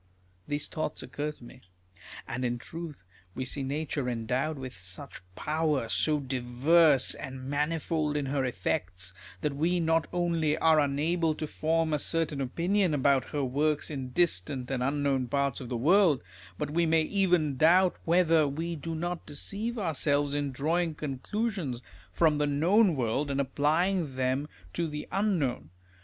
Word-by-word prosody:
" 90 0 -36
These 145 0 -2
thoughts 155 -1 -3
occur 150 +1 -3
to 140 - -18
me. 125 +1 -13 0.7
And 125 +2 -3
in 120 -1 0
truth, 160 - -8 0.3
we 130 - -3
see 140 - -3
nature 140 -1 -2
endowed 125 +6 -1
with 130 -1 -6
such 90 -2 -8
power, 150 -5 0
so 150 +6 +2
diverse 135 +3 +3
and 130 -1 -7
mani 150 +4 0
fold 155 -2 -1
in 145 - -1
her 135 0 0
effects, 90 -5 -2 0.3
that 150 -2 -1
we 170 +5 +1
not 165 -1 +2
only 170 -3 +1
are 160 -1 +4
unable 155 +3 +1
to 155 - -3
form 160 +1 0
a 150 - +1
certain 155 -2 0
opinion 175 +6 +1
about 135 -1 +3
her 145 -1 -2
works 145 +4 0
in 135 -3 -4
distant 130 - 0
and 130 -2 -1
unknown 135 -1 0
parts 140 +1 0
of 125 - -7
the 125 - -2
world, 160 - +4 0.3
but 145 - -3
we 170 +1 +2
may 160 0 +3
even 175 -5 +2
doubt 175 +6 +5
whether 165 -3 +4
we 165 +5 -3
do 165 +2 -5
not 175 +2 -4
deceive 205 - -3
ourselves 145 -6 +1
in 145 -1 -1
drawing 160 +5 0
conclusions 155 - -3 0.3
from 155 - +3
the 145 - +2
known 175 +7 +3
world, 130 +3 0
and 140 0 -1
applying 150 +3 +1
them 130 +3 0 0.3
to 170 - -1
the 150 -1 -6
unknown. 165 - 0
150 Hz, 160 wpm, -29 LUFS, 130-165 Hz, 0.7 s, doubt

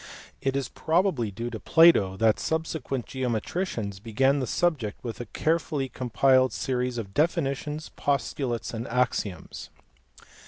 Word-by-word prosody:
It 135 0 0
is 140 -1 -1
probably 160 - +1
due 115 +4 -5
to 110 - -5
Plato 130 - +5
that 110 0 +3
subsequent 160 -6 -2
geometricians 120 - -3
began 130 +6 +2
the 130 - -2
subject 135 -9 -1
with 115 -1 -5
a 120 - -7
carefully 155 -1 -1
compiled 130 0 +3
series 125 -1 -1
of 100 -4 -5
definitions, 150 0 -1
postulates, 135 -4 -1
and 115 +2 -4
axioms. 110 -8 -2
130 Hz, 125 wpm, -27 LUFS, 115-150 Hz, -, Plato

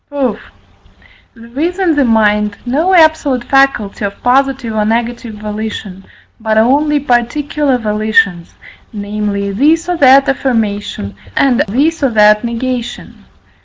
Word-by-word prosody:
Proof. 260 -7 -2 1.0
There 235 +3 -11
is 355 +2 -2
in 370 -4 +1
the 290 - +2
mind 210 -3 +1
no 315 +10 +1
absolute 315 -6 +3
faculty 270 -8 +1
of 200 0 -5
positive 265 -2 +1
or 215 -1 0
negative 230 +1 -2
volition, 210 -2 -6 0.3
but 220 -1 -1
only 290 +6 +2
particular 275 +2 0
volitions, 210 -5 0 0.4
namely, 205 -1 -3
this 310 - +1
or 355 -1 -1
that 275 -1 +5
affirmation, 210 - -2 0.2
and 260 -3 +2
this 295 +11 0
or 275 - +2
that 210 -1 +4
negation. 235 -2 -5
235 Hz, 125 wpm, -13 LUFS, 210-275 Hz, 1.0 s, that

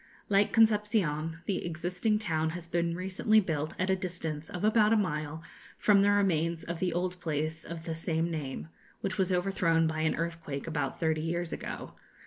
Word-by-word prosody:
Like 200 0 +4
Concepcion, 205 -8 +2
the 195 - -1
existing 180 +5 0
town 160 -7 0
has 170 -1 -7
been 170 0 0
recently 190 +4 +2
built 155 -6 -2
at 185 +1 +1
a - - +4
distance 170 -4 -4
of 180 -2 -5
about 215 0 +5
a - - +5
mile 155 -4 -2 0.3
from 200 -2 +5
the 200 - +4
remains 170 -5 +2
of 170 -1 -4
the 180 0 +1
old 180 +1 -2
place 155 -1 -2
of 165 -1 -7
the 165 - -3
same 165 +1 -1
name, 150 -1 -4 0.3
which 195 0 -3
was 190 -1 +2
overthrown 180 -3 +2
by 160 0 -1
an 155 0 +1
earthquake 165 -4 -4
about 160 -3 -2
thirty 160 -2 +1
years 170 +1 -2
ago. - - -6
170 Hz, 180 wpm, -30 LUFS, 160-190 Hz, 0.3 s, about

